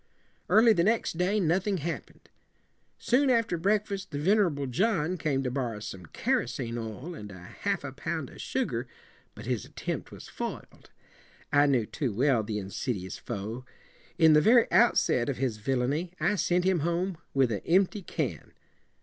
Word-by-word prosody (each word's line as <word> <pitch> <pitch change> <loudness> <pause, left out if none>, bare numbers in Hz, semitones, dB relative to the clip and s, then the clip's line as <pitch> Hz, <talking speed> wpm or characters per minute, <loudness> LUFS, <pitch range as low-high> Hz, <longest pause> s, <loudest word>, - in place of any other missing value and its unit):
Early 225 +1 +6
the 170 -4 +2
next 215 -5 +1
day 195 +4 +2
nothing 190 +3 +1
happen 170 +1 -5
ed. - - -23 0.7
Soon 265 +3 +2
after 230 -7 +2
breakfast 200 +2 0
the 145 - -5
vener 190 +4 +3
able 140 -1 -4
John 175 - 0
came 145 -5 -1
to 125 - -2
bor 125 -3 -2
row 105 - -7
some 95 -5 -8
ker - - 0
o - - -5
sene 120 -1 -4
oil 115 - -6
and 105 -10 -9
a 95 - -10
half 90 - -3
a - - -5
pound - - -4
of - - -10
sugar, - - -2 0.5
but - - -9
his - - -1
attempt - - -5
was - - -10
foil - - -5
ed. - - -21 0.6
I 145 0 +5
knew 125 -6 +2
too 130 +2 -3
well 130 -1 +3
the 105 0 -4
in 100 -1 -6
sid 125 0 -2
i 90 - -7
ous 95 - -7
foe. 115 +1 -5 0.5
In 160 -3 +6
the 150 - +6
very 235 +6 +6
out 240 0 +5
set 120 +2 +2
of 135 - -2
his 125 -4 -1
vil 130 +5 -1
la 125 - 0
in 130 - 0
y 165 +4 -2
I 170 +6 +2
sent 180 -1 +1
him 185 -2 +2
home 170 +2 -1 0.2
with 135 -3 +3
a 105 - -3
empty 190 +4 +3
can. 135 - -4
150 Hz, 205 wpm, -28 LUFS, 120-185 Hz, 0.7 s, Early